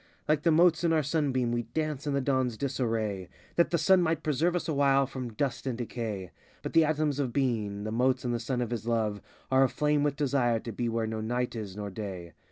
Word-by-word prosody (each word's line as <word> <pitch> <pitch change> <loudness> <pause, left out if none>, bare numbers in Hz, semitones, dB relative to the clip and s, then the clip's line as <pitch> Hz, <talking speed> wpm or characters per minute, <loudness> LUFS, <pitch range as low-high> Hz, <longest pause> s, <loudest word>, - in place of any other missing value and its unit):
Likes 150 -1 +2
the 165 - +2
motes 170 +1 +4
in 170 - +3
the 160 -2 +2
sun 145 0 0
beam 125 -2 0
we 120 0 0
dance 150 +4 -3
in 145 - 0
the 140 - +1
dawn's 130 -4 0
disarray 115 -8 -2 0.3
That 170 - +3
the 170 - +1
sun 180 +4 +4
might 160 -2 0
preserve 155 +4 +1
us 175 - -2
awhile 140 -3 +3
from 130 -3 -6
dust 135 +3 -2
and 125 -3 -2
decay; 110 -6 -4 0.3
But - - -5
the 165 -1 +6
atoms 150 -2 0
of 130 -4 0
being, 110 -7 -1
the 110 - -3
motes 125 +2 +1
in 120 - 0
the 120 - -1
Sun 125 +1 -2
of 120 -1 -2
his 115 -1 -4
Love, 110 -3 0 0.3
Are 130 0 +5
aflame 150 +3 +1
with 145 -1 +1
desire 130 -5 +1
to 115 - -6
be 120 +2 -2
where 115 0 -1
no 110 0 -3
night 120 +2 -2
is 105 -4 -6
nor 105 -1 -5
day. 95 -4 -6
130 Hz, 235 wpm, -29 LUFS, 115-145 Hz, 0.3 s, the